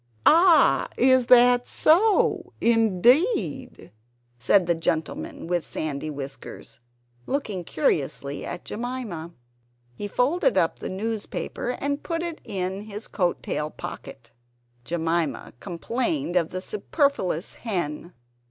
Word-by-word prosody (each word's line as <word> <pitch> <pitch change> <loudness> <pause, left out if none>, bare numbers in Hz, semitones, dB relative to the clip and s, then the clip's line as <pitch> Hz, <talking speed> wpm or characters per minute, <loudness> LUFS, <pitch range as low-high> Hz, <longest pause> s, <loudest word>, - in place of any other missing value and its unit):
"Ah! 335 -2 +6
is 260 -1 +4
that 245 0 +6
so? 390 +7 +3
Indeed!" 245 - +2 0.5
said 180 +10 +4
the 170 - +2
gentleman 280 - -3
with 175 -1 -1
sandy 155 0 -4
whiskers, 140 -4 -8 0.5
looking 215 -10 -2
curiously 140 -3 -1
at 175 - -6
Jemima. 225 -9 -5 0.6
He 205 +11 -5
folded 325 - +1
up - - +1
the - - -5
newspaper 225 +4 -4
and 285 +1 -2
put 335 -1 -3
it 340 -2 -5
in 190 -1 -4
his 210 0 -7
coattail 175 -4 -2
pocket. - - -9 0.5
Jemima 165 -3 -2
complained 240 - -2
of 170 -2 +2
the 185 - -5
superfluous 205 - -1
hen. 175 -6 -4
210 Hz, 105 wpm, -25 LUFS, 170-265 Hz, 0.6 s, Ah